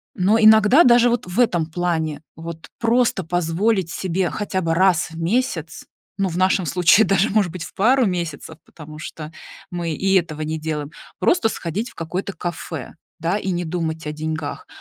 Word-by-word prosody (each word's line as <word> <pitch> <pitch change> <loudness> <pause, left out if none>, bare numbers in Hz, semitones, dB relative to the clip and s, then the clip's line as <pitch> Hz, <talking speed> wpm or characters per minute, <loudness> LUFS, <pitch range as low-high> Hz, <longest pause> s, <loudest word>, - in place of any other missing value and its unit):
Но 205 +4 +3
иногда 220 +7 +7
даже 240 0 +6
вот 240 - -1
в 180 +4 -7
этом 175 -10 +2
плане, 160 -3 -2 0.2
вот, 165 0 -8
просто 230 -5 +1
позволить 175 +3 0
себе 185 +1 -1
хотя 200 -3 -3
бы 165 -2 0
раз 180 -1 +3
в 165 - -9
месяц, 170 - -1 0.3
ну, 195 -1 0
в 175 - -5
нашем 185 -1 +2
случае 180 +5 +4
даже, 195 +3 +2
может 200 -5 +2
быть, 175 -1 -6
в - - -10
пару 250 +5 +3
месяцев. 170 -5 -4
Потому 155 -1 -12
что 155 -1 -8 0.4
мы 170 -2 -3
и 190 +4 0
этого 155 -4 0
не 155 +1 -3
делаем, 150 -2 -4 0.3
просто 245 -11 +2
сходить 200 +8 -4
в - - -20
какое-то 180 +4 -4
кафе, 165 -6 -6 0.2
да, 170 +5 0
и 195 - -3
не 175 -1 -2
думать 160 -1 -3
о - - -2
деньгах. 155 -1 -5
175 Hz, 180 wpm, -21 LUFS, 160-200 Hz, 0.4 s, иногда